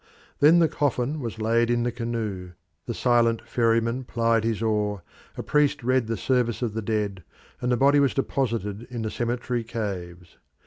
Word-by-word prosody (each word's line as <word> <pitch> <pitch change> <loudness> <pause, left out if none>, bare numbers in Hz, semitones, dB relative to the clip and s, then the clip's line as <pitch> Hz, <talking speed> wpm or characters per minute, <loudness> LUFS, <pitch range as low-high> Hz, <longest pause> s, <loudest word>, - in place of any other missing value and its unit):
Then 155 +4 +6
the 170 -1 +5
coffin 145 0 -1
was 115 -4 -5
laid 115 +2 +2
in 120 0 +1
the 120 - 0
canoe, 110 -6 -4 0.3
the 120 - -2
silent 115 -2 +2
ferryman 115 +1 +1
plied 115 -2 +1
his 115 -2 -1
oar, 105 -3 0 0.3
a - - -4
priest 150 -3 +1
read 130 -1 +2
the 115 -1 -2
service 125 0 0
of 115 -3 -2
the 110 - -3
dead, 105 -3 -2 0.4
and 125 - 0
the 120 - +2
body 140 +2 +5
was 140 -2 +2
deposited 115 -6 -2
in 120 -2 -4
the 110 - -3
cemetery 120 0 -2
caves. 90 -6 -6
115 Hz, 175 wpm, -25 LUFS, 110-125 Hz, 0.4 s, Then